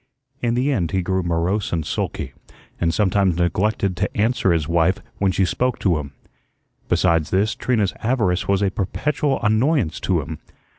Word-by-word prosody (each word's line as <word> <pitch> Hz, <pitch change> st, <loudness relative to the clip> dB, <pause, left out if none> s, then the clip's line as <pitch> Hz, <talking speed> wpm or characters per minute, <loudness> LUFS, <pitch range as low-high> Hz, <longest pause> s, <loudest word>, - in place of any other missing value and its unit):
In 120 Hz, -1 st, +1 dB
the 130 Hz, +4 st, +1 dB
end 90 Hz, -, 0 dB
he 95 Hz, -1 st, +1 dB
grew 95 Hz, +1 st, 0 dB
morose 85 Hz, +4 st, -1 dB
and 80 Hz, -3 st, -1 dB
sulky, -, -, -3 dB, 0.5 s
and 85 Hz, -1 st, +2 dB
sometimes 95 Hz, -1 st, +2 dB
neglected 95 Hz, +2 st, 0 dB
to -, -, -2 dB
answer 110 Hz, -2 st, +2 dB
his 80 Hz, -3 st, +1 dB
wife 85 Hz, +2 st, +2 dB, 0.2 s
when 100 Hz, -1 st, +2 dB
she 95 Hz, +1 st, +2 dB
spoke 125 Hz, +6 st, 0 dB
to 85 Hz, -6 st, +1 dB
him. 70 Hz, -1 st, -7 dB, 0.8 s
Besides 85 Hz, -4 st, +2 dB
this, 105 Hz, +4 st, +1 dB
Trina's 110 Hz, -7 st, 0 dB
avarice 110 Hz, -7 st, 0 dB
was 100 Hz, 0 st, +2 dB
a 95 Hz, -, +1 dB
perpetual 140 Hz, -, -1 dB
annoyance 110 Hz, -, +2 dB
to 90 Hz, -4 st, 0 dB
him. 80 Hz, +1 st, -7 dB
95 Hz, 165 wpm, -21 LUFS, 85-110 Hz, 0.8 s, and